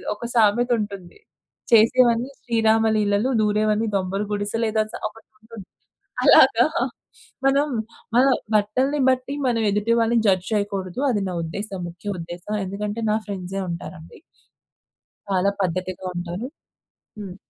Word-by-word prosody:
ఒక 210 - -12
సామెతుంటుంది. 210 - +1 0.5
చేసేవన్నీ 235 +2 +4
శ్రీరామ 225 -1 +2
లీలలు 205 +3 +1
దూరేవన్నీ 215 +1 +1
దొంబల 195 +2 -1
గుడిసె 205 +2 -2
లేదా 220 0 +1
సా - - -4
ఒకటుంటుంది. 220 -1 -15 0.6
అలాగా - - +6 0.8
మనం 280 +2 +3 0.5
మన 255 - +6 0.3
బట్టల్ని 255 +8 +1
బట్టి 260 +2 -1
మనం 230 -2 +1
ఎదుటి 210 +3 0
వాళ్ళని 230 +1 +2
జడ్జ్ 185 -1 +2
చేయకూడదు. 200 0 -2
అది 205 -4 0
నా 180 - -4
ఉద్దేశం 195 +3 -5
ముఖ్య 175 +4 -7
ఉద్దేశం. 175 +5 -6
ఎందుకంటే 210 +3 -4
నా 215 - +2
ఫ్రెండ్సే 195 -1 -4
ఉంటారండి. 170 - -8 1.1
చాలా 195 0 +2
పద్ధతిగా 185 +1 -3
ఉంటారు. 175 +6 -4 0.7
హ్మ్. 190 -3 -7
210 Hz, 115 wpm, -23 LUFS, 190-230 Hz, 1.1 s, అలాగా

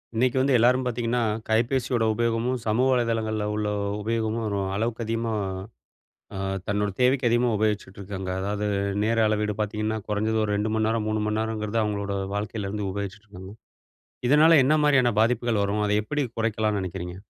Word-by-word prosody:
இன்னைக்கு 125 +2 +2
வந்து 135 0 +2
எல்லாரும் 125 +3 +4
பார்த்தீங்கன்னா, 120 0 -1 0.3
கைபேசியோட 120 +1 +1
உபயோகமும், 115 +2 0
சமூக 115 +4 +2
வலைதளங்கள்ல 115 -3 0
உள்ள 105 0 -1 0.3
உபயோகமும் 115 +1 -1
ஒரு 100 -1 -1 0.2
அளவுக்கு 115 +2 -2
அதிகமா 115 0 -2 1.0
அ - - -4 0.3
தன்னோட 105 0 0
தேவைக்கு 125 0 +3
அதிகமா 120 +1 +2
உபயோகிச்சுட்ருக்காங்க. 100 -2 -3
அதாவது 105 +2 -2 0.4
நேர 115 +1 +1
அளவீடு 105 0 0
பார்த்தீங்கன்னா, 105 +1 -2
குறஞ்சது 110 +1 0
ஒரு 105 - -1
2 105 +1 -1
மணி 110 0 +1
நேரம், 110 -1 0
3 110 0 0
மணிநேரம்ங்கிறது 110 0 -1
அவுங்களோட 100 -1 -2 0.2
வாழ்க்கையிலிருந்து 105 -1 -3
உபயோகிச்சுட்ருக்காங்க. 100 -1 -7 0.7
இதனால 155 +4 +6
என்ன 145 - +4
மாரியான 135 -5 +4
பாதிப்புகள் 115 -2 +1
வரும்? 105 +1 0
அதை 105 - +2
எப்பிடி 145 +6 -1
குறைக்கலான்னு 110 -2 0
நினைக்கிறீங்க? 90 -1 -5
110 Hz, 140 wpm, -25 LUFS, 105-120 Hz, 1.0 s, இதனால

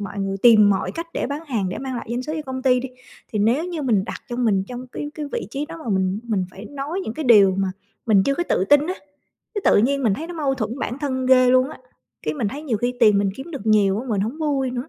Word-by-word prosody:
mọi 200 0 -6
người 195 0 -2
tìm 215 -4 +7
mọi 195 - -1
cách 335 0 -6
để - - -1
bán 285 +3 -4
hàng, 220 -9 -1
để 185 - -4
mang 265 -1 -4
lại - - -6
doanh 240 +1 -2
số 305 - -5
cho 310 - -3
công 260 0 -5
ty 255 -2 +3
đi, 265 - -5 0.4
thì 215 - -1
nếu 235 +10 +2
như 345 -4 -4
mình 220 -8 +2
đặt - - -6
cho 240 - -4
mình 215 -6 +1
trong 250 +1 -7
cái 290 +3 -5
cái 300 -1 -5
vị - - -3
trí 285 +2 -3
đó 330 +1 -8
mà - - -6
mình 190 +1 0
mình 210 -6 -1
phải 195 +3 -11
nói 290 +6 -4
những 220 - -5
cái 315 - -4
điều 205 -6 +6
mà 195 -1 +1 0.4
mình 205 -4 +5
chưa 275 - +1
có 345 - -1
tự 185 - +2
tin 290 +7 +4
á, 365 - -2 0.6
cái 410 - -2
tự - - +5
nhiên 275 +5 +2
mình 220 -6 +2
thấy 320 - -6
nó 350 - -7
mâu 290 -4 0
thuẫn 235 +1 -4
bản 245 - -3
thân 260 -3 -2
ghê 255 -1 +6
luôn 255 +2 +3
á, - - -10 0.4
cái - - -2
mình 240 -8 -1
thấy 285 +8 -7
nhiều 260 -8 -1
khi 245 +3 -1
tiền 210 -3 +6
mình 200 -1 +1
kiếm 270 +6 -8
được 275 -9 -7
nhiều 205 -1 +3
á 260 - -8
mình 210 -4 0
hổng 235 +9 -4
vui 280 -4 0
nữa. 250 +3 -5
250 Hz, 295 wpm, -22 LUFS, 210-285 Hz, 0.6 s, tìm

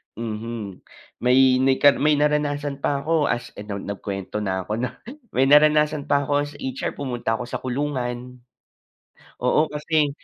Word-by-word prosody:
mhm, 110 -3 -5 0.4
may 130 +1 +4
may 130 0 +3
ka 145 +2 +6
naranasan 150 -1 +1
pa 140 0 -1
ako, 160 -2 +2
as- 120 - -2
ano 105 -1 -5
nagkuwento 100 0 -5
na 95 -2 -2
ako 105 +4 -3
'no- 125 - 0 0.5
may 130 - +4
naranasan 150 +1 +4
pa 140 0 +2
ako 145 - -5 0.2
as 145 - -10
HR 130 -2 -4
pumunta 120 -4 -2
ako 125 - -4
sa 120 - -5
kulungan. 125 -2 -3 1.0
Oo, 155 +1 +2
kasi 150 0 +1
130 Hz, 145 wpm, -23 LUFS, 115-145 Hz, 1.0 s, ka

